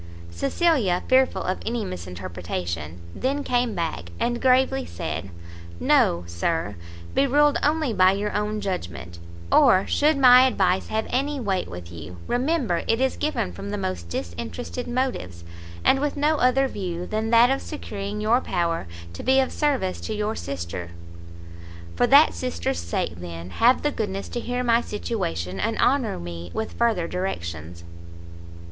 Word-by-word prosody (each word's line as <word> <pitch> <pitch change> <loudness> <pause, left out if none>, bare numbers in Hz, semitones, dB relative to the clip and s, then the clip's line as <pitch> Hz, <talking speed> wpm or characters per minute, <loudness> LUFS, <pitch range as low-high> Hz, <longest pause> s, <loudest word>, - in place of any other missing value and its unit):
Cecilia, 185 - +1
fearful 260 0 +3
of 185 - -2
any 230 -2 -2
misinterpretation, 85 - -5
then 280 +2 -1
came 245 -4 0
back, 160 - -3
and 240 0 -1
gravely 265 +1 +3
said, 160 - -5 0.5
"No, 85 0 +3
Sir, 100 - -2 0.4
be 275 - +3
ruled 290 +2 +4
only 300 -4 +1
by 185 -1 +5
your 205 +1 -2
own 210 0 -1
judgment; 85 - -5 0.3
or, 185 +1 +6
should 300 0 +2
my 255 -1 +8
advice 190 -6 +1
have 220 0 -1
any 280 +3 0
weight 195 -6 -1
with 85 -1 -9
you, 85 +1 -9
remember 250 - 0
it 225 - +2
is 265 0 +1
given 300 - -1
from 100 +3 -7
the 105 - -2
most 95 -3 -4
disinterested 85 -1 -5
motives, 240 - -2 0.4
and 270 - +5
with 295 0 -1
no 300 +2 +2
other 265 +1 +3
view 180 -7 -4
than 220 +2 -2
that 235 +2 +6
of 270 - 0
securing 205 -8 -5
your 225 +4 +3
power 170 - -1 0.3
to - - -7
be 265 +1 +4
of 265 - +1
service 270 -12 0
to 220 - -4
your 210 +1 -1
sister." 85 -8 -5 1.1
"For - - +3
that - - +7
sister's 85 0 -2
sake, 85 0 -3
then, 85 0 -8
have 245 - +3
the 295 - +1
goodness 200 -6 -3
to 240 - -3
hear 245 +1 -2
my 235 -1 +3
situation, 95 - -3
and 225 0 -1
honour 265 - +2
me 85 0 -7
with 220 0 -3
further 225 -8 +1
directions." 85 - -5
195 Hz, 155 wpm, -24 LUFS, -, 1.1 s, my